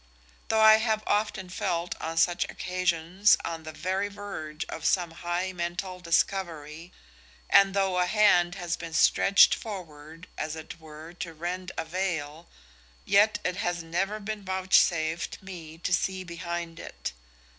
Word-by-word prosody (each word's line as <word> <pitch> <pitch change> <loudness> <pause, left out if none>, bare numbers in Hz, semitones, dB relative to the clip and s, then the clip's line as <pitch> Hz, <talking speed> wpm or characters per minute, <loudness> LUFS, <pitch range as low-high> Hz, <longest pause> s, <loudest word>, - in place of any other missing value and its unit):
Though 220 0 +2
I 220 0 +9
have 220 -1 0
often 205 -2 0
felt 175 -1 -2
on 165 +1 -4
such 175 +1 +3
occasions 185 +2 +1
on 165 -1 -4
the 155 0 -8
very 190 +5 -2
verge 195 -6 -6
of 160 - -7
some 175 0 +1
high 175 +2 -3
mental 180 +1 -4
discovery, 170 -2 -1 0.6
and 195 -1 +5
though 190 -2 +1
a 180 - +2
hand 180 -4 +4
has 175 -3 -2
been 165 -1 -8
stretched 200 +4 +6
forward 165 -5 -8
as 155 0 -3
it 160 +1 -9
were 160 +1 -11
to 165 -2 -5
rend 180 +3 -4
the - - -2
veil, 160 -3 -3 0.6
yet 210 +2 +4
it 180 0 -2
has 175 -5 -2
never 195 +6 -2
been 215 0 -5
vouchsafed 175 -4 +1
me 165 -4 -9
to 180 +2 -2
see 185 +1 0
behind 170 -1 -5
it. - - -6
175 Hz, 145 wpm, -27 LUFS, 165-195 Hz, 0.6 s, I